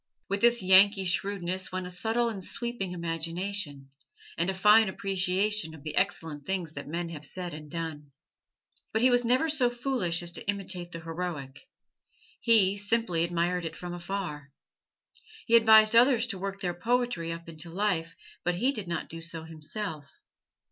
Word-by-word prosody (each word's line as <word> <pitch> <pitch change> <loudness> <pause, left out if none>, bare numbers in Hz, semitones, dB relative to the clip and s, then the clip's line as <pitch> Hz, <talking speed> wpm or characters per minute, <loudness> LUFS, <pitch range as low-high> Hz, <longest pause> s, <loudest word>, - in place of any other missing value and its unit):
With 200 +1 -1
this 235 -3 +4
Yankee 190 +1 +6
shrewdness 185 0 -1
went 185 0 -3
a 180 - -5
subtle 225 +6 0
and 205 -5 -4
sweeping 235 -5 -3
imagination, 165 -3 -3 0.4
and 170 +3 0
a - - 0
fine 210 +2 +6
appreciation 190 -2 0
of 145 - -14
the 155 - -5
excellent 160 -6 -1
things 185 -4 -2
that 140 -2 -8
men 170 +2 -3
have 155 -3 -8
said 175 +3 -4
and 150 0 -9
done. 155 -3 -5 0.8
But 220 - +1
he 255 - +6
was 245 0 +4
never 255 +7 +2
so 295 -6 +2
foolish 240 -9 -1
as 170 - -3
to - - -6
imitate 185 -3 -1
the 165 - -7
heroic 165 - -6 0.7
he, 205 -4 +4
simply 205 -5 +1
admired 175 +1 0
it 165 0 -5
from 175 0 -6
afar. 175 -5 -5 0.9
He 230 - +4
advised 220 -1 +7
others 245 0 +5
to 210 -6 -4
work 195 +1 -5
their 175 -2 -1
poetry 230 -3 -1
up 170 0 -7
into 165 0 -7
life, 170 -3 -1 0.3
but 175 0 0
he 250 +9 +2
did 215 -9 -5
not 170 -1 -3
do 165 0 -8
so 165 -1 -5
himself. 160 -1 -5
180 Hz, 170 wpm, -28 LUFS, 165-210 Hz, 0.9 s, advised